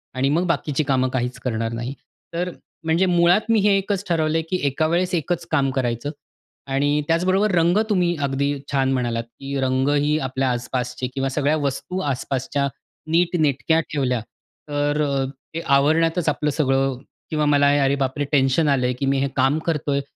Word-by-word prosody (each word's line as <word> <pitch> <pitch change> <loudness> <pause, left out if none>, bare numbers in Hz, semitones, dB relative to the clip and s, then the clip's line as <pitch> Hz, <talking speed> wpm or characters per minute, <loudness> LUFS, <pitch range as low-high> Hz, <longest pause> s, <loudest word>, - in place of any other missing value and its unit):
आणि 130 +1 +1
मग 165 +5 +1
बाकीची 155 -2 0
कामं 130 -2 +1
काहीच 125 -1 -2
करणार 115 -2 -2
नाही. 120 +3 -4 0.4
तर 180 +2 -2 0.3
म्हणजे 165 +3 +2
मुळात 175 +2 +4
मी 225 -1 +4
हे 200 0 +4
एकच 195 0 -2
ठरवलं 160 -2 +1
आहे, - - +1
की 185 - +1
एका 140 +3 0
वेळेस 175 +3 0
एकच 170 +1 -2
काम 140 -4 +2
करायचं. 120 +1 -1 0.6
आणि 145 +2 +1
त्याचबरोबर 185 +5 +2
रंग 170 +3 +3
तुम्ही 180 -4 +2
अगदी 140 +1 0 0.2
छान 135 -1 +1
म्हणालात, 120 -3 -1
की 135 +4 -6
रंगही 145 +3 +2
आपल्या 130 -1 -1
आसपासचे 125 +1 -3
किंवा 135 0 -1
सगळ्या 145 +2 +1
वस्तू 145 +6 -3
आसपासच्या 140 -1 -1 0.4
नीटनेटक्या 160 -3 +2
ठेवल्या, 125 -5 0 0.5
तर 145 +1 0
अ, 140 -2 0 0.3
ते 165 - -3
आवरण्यातच 160 +4 +3
आपलं 150 +1 0
सगळं 135 -3 +1 0.3
किंवा 150 -1 0
मला 145 -1 +4
अरे 135 +1 +2
बापरे! 140 +1 -1
टेन्शन 140 +2 +3
आलं 135 -3 +2
आहे 125 - +1
की 140 - 0
मी 135 0 +1
हे 140 - +1
काम 135 +3 +2
करतो 150 -3 0
आहे, 140 0 +1
145 Hz, 170 wpm, -22 LUFS, 135-165 Hz, 0.6 s, मुळात